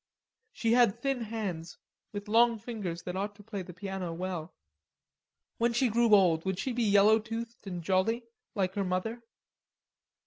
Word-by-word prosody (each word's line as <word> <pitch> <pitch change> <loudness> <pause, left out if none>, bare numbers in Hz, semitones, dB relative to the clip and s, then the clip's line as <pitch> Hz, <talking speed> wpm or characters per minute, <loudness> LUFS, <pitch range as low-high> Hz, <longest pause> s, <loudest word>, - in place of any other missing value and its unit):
She 230 - 0
had 240 -5 +4
thin 270 -3 -1
hands, 190 -7 -4 0.3
with 205 0 -6
long 230 +2 +4
fingers 205 -7 -5
that 180 0 -5
ought 205 +2 -3
to 205 - -15
play 205 -2 -5
the 180 - -9
piano 190 -1 -5
well. 175 -1 -5 1.0
When 235 0 +2
she 240 +1 +2
grew 230 -1 +5
old 170 -5 +4
would 190 -1 -1
she 250 +6 -2
be 240 - -1
yellow 210 0 +5
toothed 225 0 -6
and 175 -3 -5
jolly, 195 +7 +1 0.3
like 190 -2 0
her 200 - -1
mother? 190 +6 -2
205 Hz, 165 wpm, -30 LUFS, 185-230 Hz, 1.0 s, grew